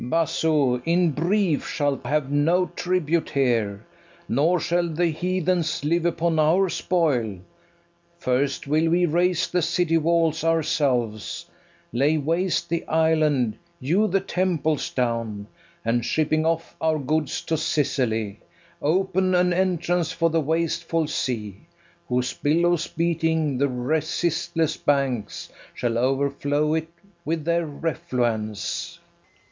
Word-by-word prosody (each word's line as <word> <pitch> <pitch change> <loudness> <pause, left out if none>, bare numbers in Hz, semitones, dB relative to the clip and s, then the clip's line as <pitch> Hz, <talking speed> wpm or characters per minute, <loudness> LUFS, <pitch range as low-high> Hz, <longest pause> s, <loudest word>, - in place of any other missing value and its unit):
FERNEZE. 120 - -5
Basso, 155 -5 +1
in 170 +1 +2
brief, 170 +2 0
shalt 145 -3 -1
have 145 0 0
no 165 +6 +3
tribute 170 -3 0
here, 115 -7 0 0.4
Nor 160 +8 +2
shall 175 +1 0
the 165 +2 0
heathens 175 -2 -1
live 170 +2 +2
upon 170 -1 0
our 175 +5 +3
spoil: 140 - 0 0.8
First 135 +2 0
will 155 +3 +2
we 175 +2 +3
raze 175 +2 +1
the 180 - 0
city 170 0 +1
walls 165 0 +1
ourselves, 140 -10 0 0.5
Lay 140 +6 +2
waste 165 +5 0
the 170 0 -2
island, 155 -7 +2 0.2
hew 175 +11 +2
the 195 0 +2
temples 175 -6 -1
down, 115 -4 -2 0.4
And, 115 +1 +1
shipping 155 +3 +1
off 165 0 -2
our 160 -1 +2
goods 150 0 -1
to 165 - -1
Sicily, 130 -10 -1 0.4
Open 185 +3 +1
an 180 0 +3
entrance 175 -2 0
for 165 0 +1
the 165 0 +2
wasteful 165 +1 0
sea, 115 - -4 0.4
Whose 125 0 0
billows, 170 +2 +1
beating 160 -4 0
the 140 0 +2
resistless 160 +5 -1
banks, 135 -7 -1 0.2
Shall 120 -2 -1
overflow 140 +3 0
it 160 0 -1 0.4
with 160 -1 -2
their 170 0 +1
refluence. 125 -9 -2
155 Hz, 120 wpm, -24 LUFS, 135-170 Hz, 0.8 s, no